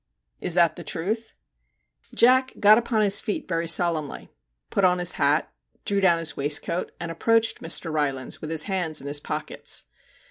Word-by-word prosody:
' - - -46
Is 175 - 0
that 170 -3 +3
the 175 - -7
truth?' 215 +9 -3 0.8
Jack 260 +2 +4
got 215 +2 +7
upon 230 -2 -1
his 200 -1 +4
feet 210 - -4
very 165 -2 -2
solemnly, 165 -3 -1 0.4
put 200 - 0
on 180 -1 +4
his 175 0 +1
hat, 145 +3 +1 0.3
drew 200 -1 0
down 175 -3 +4
his 165 -2 -2
waistcoat, 145 +4 -1
and 170 -1 -4
approached 225 +6 +1
Mr. 165 0 -2
Rylands 140 -4 -2
with 155 - -6
his 160 -1 +2
hands 175 -5 -2
in - - -11
his 145 +1 -2
pockets. - - -3
170 Hz, 175 wpm, -24 LUFS, 155-205 Hz, 0.8 s, got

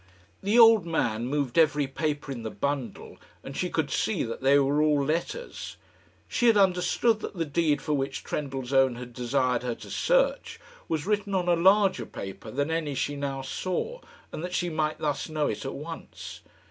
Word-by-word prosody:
The 205 +4 +1
old 225 -4 +8
man 120 -8 0
moved 140 0 0
every 150 -2 +4
paper 145 +1 -3
in 125 -3 -5
the 110 - -4
bundle, 135 -4 -4 0.2
and - - -8
she - - -1
could - - -1
see - - 0
that 115 - -5
they 135 +2 +5
were 140 +2 +2
all 150 -2 +3
letters. 170 - -3 0.5
She 240 - +1
had 225 -2 +6
understood 195 +4 +3
that - - -6
the 165 -2 -1
deed 150 0 +1
for 150 - -1
which 135 -1 -2
Trendellsohn 135 -2 0
had 125 0 -9
desired 125 0 0
her 125 -2 -3
to - - -11
search - - +1 0.3
was 160 -1 -2
written 205 -1 0
on 180 -1 0
a 175 - +4
larger 190 - +4
paper 100 +3 -8
than 145 +7 -1
any 160 -4 -1
she 145 +2 -1
now 140 -1 -3
saw, 185 - -3 0.3
and 155 - -6
that 180 0 -4
she 175 -1 -1
might 155 -1 -1
thus 150 +1 -2
know 155 -1 0
it 105 -2 -3
at 135 - -4
once. 165 +3 -8
150 Hz, 185 wpm, -27 LUFS, 135-175 Hz, 0.5 s, old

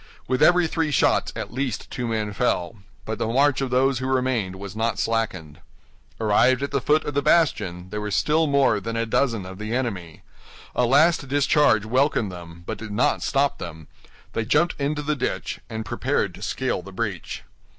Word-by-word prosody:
With 130 +2 0
every 175 +2 +5
three 160 -1 -1
shots 150 - +2
at - - -6
least 130 -3 -3
two 120 - -3
men 110 -2 -2
fell; 110 -3 -1 0.3
but 110 -1 -4
the - - 0
march 135 +4 +2
of 135 - -1
those 130 0 +2
who 130 - -3
remained 125 -7 0
was 100 0 -8
not 115 +1 0
slackened. 95 -10 -2 0.6
Arrived 120 +5 +3
at 140 - -3
the 140 - 0
foot 150 +3 +2
of 150 - -3
the 145 - +1
bastion, 95 - +1
there 105 - -3
were 105 - -3
still 155 +9 +2
more 140 -6 +3
than 115 +3 -4
a 115 - 0
dozen 115 -3 0
of 95 +1 -9
the 110 +2 -3
enemy. 95 -11 -4 0.5
A 125 - +2
last 150 +3 +4
discharge 140 -5 +3
welcomed 125 -3 +1
them, 85 -1 -10
but - - -5
did 110 - -7
not 105 +5 +1
stop 140 0 +1
them; 80 -3 -8 0.5
they 115 - -1
jumped 150 +9 +2
into 150 +1 -1
the 150 +1 0
ditch, 135 - -3
and 110 -1 -5
prepared - - -1
to - - -13
scale - - -2
the 100 +2 -11
breach. 95 -3 -4
115 Hz, 190 wpm, -24 LUFS, 105-140 Hz, 0.6 s, every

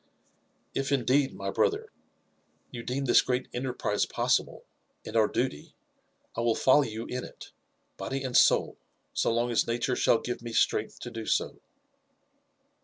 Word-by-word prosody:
''If 135 +1 -1
indeed, 135 +1 +2
my - - -5
brother, 445 -1 0 0.8
you 120 - -6
deem 130 +4 -3
this 125 - +6
great 125 0 -1
enterprise 125 -5 -1
possible, - - 0 0.4
and 110 - -7
our 110 -2 +5
duty, 120 - -3 0.6
I 115 - -1
will 115 -1 +2
follow 130 +3 +5
you 115 -4 -4
ip 125 0 -4
it, - - -11 0.5
body 135 0 -4
and 130 -2 -4
soul, - - +4 0.4
so - - +1
long 120 +1 0
as 115 - +2
nature 120 +2 0
shall - - +3
give 120 +1 -5
me 120 -1 -7
strength 110 -1 +1
to 120 - -6
do 115 -1 -6
so." - - -1
125 Hz, 155 wpm, -28 LUFS, 115-135 Hz, 0.8 s, this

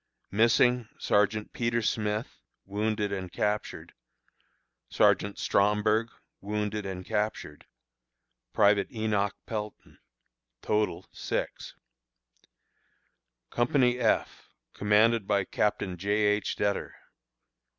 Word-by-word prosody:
Missing: 115 +2 +3
Sergeant 105 +1 +1
Peter 115 -1 0
Smith 105 +1 -2 0.3
(wounded 105 +1 -1
and 95 -3 -4
captured); 105 0 -3 1.0
Sergeant 100 +1 +2
Stromburg 105 +2 +2 0.3
(wounded 105 0 -3
and 95 -1 -6
captured); 105 -8 -3 0.8
Private 100 - +3
Enoch 105 -3 -1
Pelton. 105 -2 -7 0.6
Total, 105 0 0
6. - - -4 1.8
Company 125 0 +2
F, 115 -3 0 0.2
commanded 105 +1 +3
by 100 -1 +2
Captain 100 -3 -1
J. 100 +4 -5
H. 105 0 +1
Dettor. 100 -1 -2
105 Hz, 85 wpm, -28 LUFS, 100-110 Hz, 1.8 s, Missing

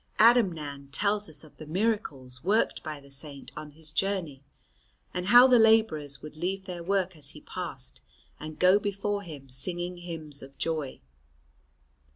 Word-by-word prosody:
Adamnan 165 - +3
tells 205 +6 +1
us 150 -1 -3
of 155 - -17
the 155 - -10
miracles 155 - -2
worked 210 +5 +1
by 155 -2 -6
the 140 0 -16
Saint 140 0 -3
on 150 0 -7
his 155 +1 -6
journey, 180 -9 -1 0.7
and 180 0 -3
how 245 +4 +9
the 250 -2 +6
labourers 215 -11 +3
would 155 0 -9
leave 190 +4 -3
their 180 -3 -5
work 185 0 0
as 145 -3 -5
he 150 - -8
passed 160 -8 -6 0.4
and 155 0 -7
go 185 +3 +5
before 205 0 -2
him 150 -8 -10
singing 175 +7 0
hymns 160 -4 -4
of 135 +1 -12
joy. 155 -5 -2
165 Hz, 160 wpm, -28 LUFS, 145-195 Hz, 0.7 s, how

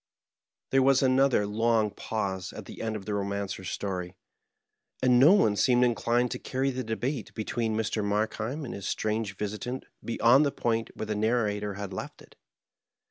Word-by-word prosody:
There 135 - +4
was 135 +1 +4
another 130 -4 +3
long 110 0 +1
pause 95 -5 -3
at - - -8
the - - -9
end 110 -1 -2
of 100 -3 -6
the 105 - -4
Bomancer's 100 -2 -3
storj, 90 -2 -4 0.9
and 125 -1 +5
no 150 +8 +8
one 110 - +4
seemed 125 +2 +4
inclined 120 0 +1
to 125 - -3
carry 135 +1 -1
the 130 0 -3
debate 120 +2 -3
between 110 0 -2
Mr. 110 -1 -1
Mark 105 +2 0
heim 130 +8 -4
and 120 - -6
his 100 0 -6
strange 110 -2 -1
visitant 110 +5 -4 0.2
beyond 120 +4 +4
the 140 - +1
point 115 -3 -1
where - - -4
the 105 - -2
narrator 105 -2 0
had 100 -1 -6
left 95 - -7
it. - - -20
110 Hz, 175 wpm, -28 LUFS, 105-125 Hz, 0.9 s, no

